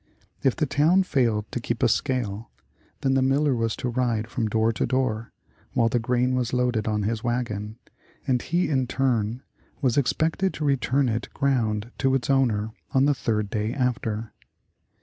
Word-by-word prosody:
If 135 - +2
the 155 - +1
town 160 +7 +3
failed 115 - +1
to - - -2
keep 120 0 -3
a - - +6
scale, 115 -4 -1 0.5
then 135 - +2
the 135 - +3
miller 135 +2 +2
was 115 -1 0
to 130 - -4
ride 120 -3 0
from 115 -1 -2
door 110 +1 +1
to - - -1
door, 115 -4 -1 0.4
while 115 -1 +3
the 120 - +1
grain 125 +2 +1
was 125 -1 -1
loaded 125 -4 +1
on 105 -1 0
his 110 +1 -2
wagon, 110 -3 -2 0.5
and 125 -4 +1
he 175 +2 0
in 130 -4 +1
turn, 120 -2 0 0.4
was 130 -2 +2
expected 160 +8 0
to 155 - -3
return 135 0 +2
it 115 0 -2
ground 115 -5 0
to 135 -1 +2
its 135 +1 0
owner 110 -5 +2 0.2
on 135 +1 +5
the 145 - +4
third 105 -5 -1
day 110 +3 -1
after. 115 -4 -2
125 Hz, 175 wpm, -25 LUFS, 110-135 Hz, 0.5 s, a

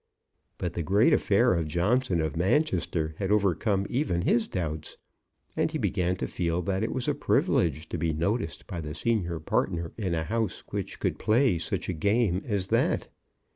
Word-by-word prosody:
But 90 -2 -3
the 85 - -2
great 100 - +4
affair 115 +2 +3
of 85 -3 0
Johnson 90 - +1
of 80 -3 -2
Manchester 85 - +1
had 95 - -1
overcome 100 0 +2
even 120 - 0
his 115 +2 +2
doubts, 80 -4 -4 0.6
and - - +1
he - - -2
began 90 0 0
to - - -3
feel 85 0 -1
that 95 +2 -1
it 110 - -1
was 130 - -2
a - - +2
privilege 80 -1 +1
to 85 - -3
be 80 0 +1
noticed 85 +4 -2
by 90 -4 -5
the 75 0 -6
senior 90 -3 -1
partner 85 +1 -1
in 95 -5 -1
a 80 - -1
house 110 +2 -2
which - - -4
could - - -1
play 115 -5 +3
such 85 +2 -3
a 95 - -1
game 100 +2 +1
as 100 -5 0
that. - - +1
90 Hz, 180 wpm, -28 LUFS, 85-105 Hz, 0.6 s, great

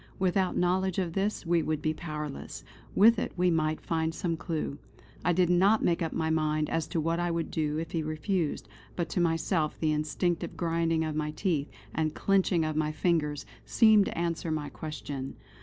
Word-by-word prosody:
Without 185 0 +1
knowledge 185 +1 +1
of 180 -4 -1
this 195 +1 -1
we 170 0 +3
would 155 -1 -1
be 155 +1 0
powerless; 150 -3 -6 0.3
with 225 +2 +6
it - - -2
we 180 0 +3
might 155 -1 +1
find 160 0 -1
some 170 -3 -1
clue. 160 -3 -3 0.4
I 175 - +3
did 180 +1 +3
not 195 +5 +4
make 170 0 +2
up 165 - -1
my 160 -1 -1
mind 155 -1 0
as 165 -2 0
to 165 - -2
what 165 +2 0
I 175 0 0
would 165 -1 -2
do 150 -1 -1
if 165 0 -4
he 165 - -1
refused; 155 +2 -2 0.3
but 170 -2 -2
to 175 - 0
myself 165 -1 0
the 155 -1 +1
instinctive 155 +3 -1
grinding 165 -1 +1
of 155 -1 -3
my 155 0 -1
teeth, 155 -2 -1 0.2
and 155 -1 -1
clenching 190 -4 +2
of 155 -1 -2
my 155 0 +1
fingers, 155 -2 0 0.2
seemed 220 -3 +5
to - - -5
answer 170 -1 -1
my 155 -2 -2
question. 145 -3 -6
165 Hz, 190 wpm, -29 LUFS, 155-175 Hz, 0.4 s, with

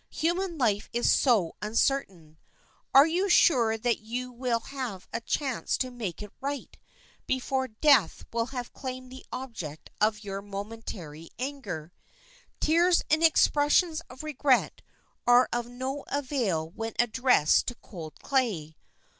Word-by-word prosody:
Human 345 +1 -1
life 215 -6 +1
is 240 0 +3
so 220 - +3
uncertain, 210 - -1 0.5
are 275 +2 +8
you 360 +5 0
sure 235 -11 +4
that 235 +1 0
you 245 +3 -5
will 245 -1 -1
have 245 -8 -6
a 230 - -2
chance 265 +1 -1
to 255 -1 -2
make 210 -6 -5
it 210 - -10
right 280 0 -4 0.5
before 260 0 0
death 235 - +3
will 230 0 0
have 250 -2 -6
claimed 255 -1 -7
the 260 - -10
object 180 - -7
of 215 0 +2
your 195 -1 -5
momentary 200 -6 -7
anger? 250 - -5 0.7
Tears 340 +3 +3
and 310 +2 +3
expressions 315 +1 +4
of 255 +4 -10
regret 285 -4 +1 0.5
are 245 +1 +6
of 240 0 -1
no 260 +3 -4
avail 240 - -1
when 225 +3 -5
addressed 240 - +3
to 245 - -3
cold 160 -9 -10
clay. 205 - 0
245 Hz, 135 wpm, -28 LUFS, 210-275 Hz, 0.7 s, are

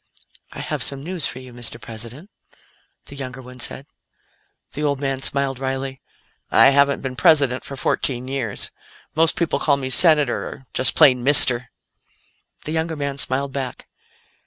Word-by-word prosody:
"I - - -8
have - - -4
some 140 0 -1
news 175 -2 -3
for - - -6
you, 130 -1 -12
Mr. 120 -1 -8
President," 120 - -9 0.7
the 140 - -10
younger 130 -2 -7
one 125 0 -13
said. 130 +2 -4 0.9
The 150 - -6
old 145 -2 -1
man 135 -1 -3
smiled 135 -1 -1
wryly. 135 0 -5 0.5
"I 135 - +5
haven't 140 0 +2
been 130 -1 -5
President 140 -5 +2
for 140 - -8
fourteen 130 -1 -2
years. 130 -6 -4 0.4
Most 160 +1 +2
people 170 -2 -1
call 140 -2 +1
me 130 -1 -4
'Senator' 150 -5 +4
or 130 - -11
just 130 - +3
plain 130 -6 +4
'Mister'." 125 -3 +7 0.9
The 155 - -6
younger 160 0 -2
man 140 -2 -5
smiled 135 +1 -1
back. 135 -2 -6
135 Hz, 160 wpm, -20 LUFS, 130-145 Hz, 0.9 s, Mister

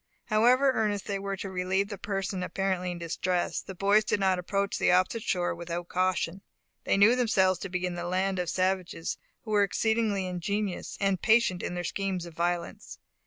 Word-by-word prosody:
However 245 +5 +4
earnest 210 -4 -1
they 200 -1 -2
were 195 0 -3
to 190 +1 -5
relieve 190 +2 0
the 205 - -5
person 195 -2 -3
apparently 185 -1 -1
in 175 - -4
distress, 175 +1 -1
the 190 - -9
boys 200 +3 +4
did 210 - 0
not 190 -2 +2
approach 200 +2 -1
the - - +3
opposite 185 +5 +2
shore 180 -4 0
without 170 0 -5
caution. 185 0 0 0.4
They - - +2
knew 210 +5 +6
themselves 190 -7 +2
to 195 - -5
be 180 0 -2
in 180 - -2
the 175 0 -4
land 185 +1 0
of 175 -2 -1
savages, 185 -2 -1 0.2
who 220 - -7
were 205 -1 +4
exceedingly 215 -1 +1
ingenious 185 +2 -3
and 195 -3 +1
patient 220 -5 +3
in 180 - -4
their 175 - -3
schemes 190 -1 -2
of 170 - -10
violence. 175 +1 -3
190 Hz, 190 wpm, -28 LUFS, 180-200 Hz, 0.4 s, knew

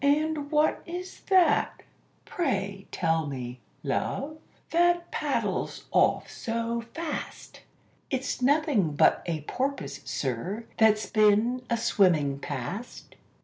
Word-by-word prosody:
"And 295 0 +2
what 305 0 +2
is 360 +2 -6
that, 370 -3 +3 0.4
pray 200 - -2
tell 160 -3 +1
me, 125 -3 -5 0.2
love, 275 - -2 0.3
that 345 0 +3
paddles - - -2
off - - +3
so 230 0 -2
fast?" 330 -1 -5 0.5
"It's 265 -1 -2
nothing 265 - +2
but - - +4
a 160 -3 -1
porpoise, 155 - -3
sir, 160 - -3
that's 215 -1 +5
been 215 +3 +3
a 235 - +2
swimming 160 -11 +2
past." 145 - -6
230 Hz, 105 wpm, -28 LUFS, -, 0.5 s, that's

